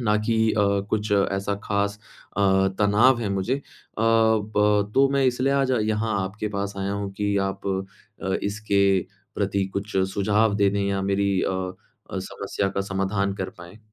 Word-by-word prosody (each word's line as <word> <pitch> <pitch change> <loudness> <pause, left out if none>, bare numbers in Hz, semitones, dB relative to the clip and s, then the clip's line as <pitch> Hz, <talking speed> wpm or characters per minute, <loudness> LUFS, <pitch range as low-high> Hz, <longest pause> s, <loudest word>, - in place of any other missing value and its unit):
ना 105 -3 +2
कि 115 - +2 0.2
अ, 105 - +2 0.3
कुछ 105 0 -1
ऐसा 100 0 +1
ख़ास 100 0 -1 0.4
अ, - - 0 0.4
तनाव 115 +5 +4
है 105 - -1
मुझे। 100 +6 0
अ, - - -8 0.4
ब 110 -2 +2
तो 135 0 +5
मैं 140 -1 +2
इसलिए 130 +2 +1
आज 135 -1 +2
यहाँ 110 0 0
आपके 105 +3 -4
पास 100 -1 -3
आया 100 +1 -2
हूँ 100 -1 -3
कि 100 0 -1
आप 95 0 -7 0.6
अ, 95 -1 -1
इसके 100 0 -1 0.6
प्रति 100 -1 0
कुछ 100 +1 -3 0.2
सुझाव 105 +1 +2
दे 100 -1 +3
दें 100 0 -1
या 100 -1 -1
मेरी 100 +1 +1
अ - - 0 0.6
अ, - - -3
समस्या 100 - -3
का - - +2
समाधान 100 0 -1
कर - - -4
पाएँ। 85 +4 -12
100 Hz, 170 wpm, -24 LUFS, 100-110 Hz, 0.6 s, तो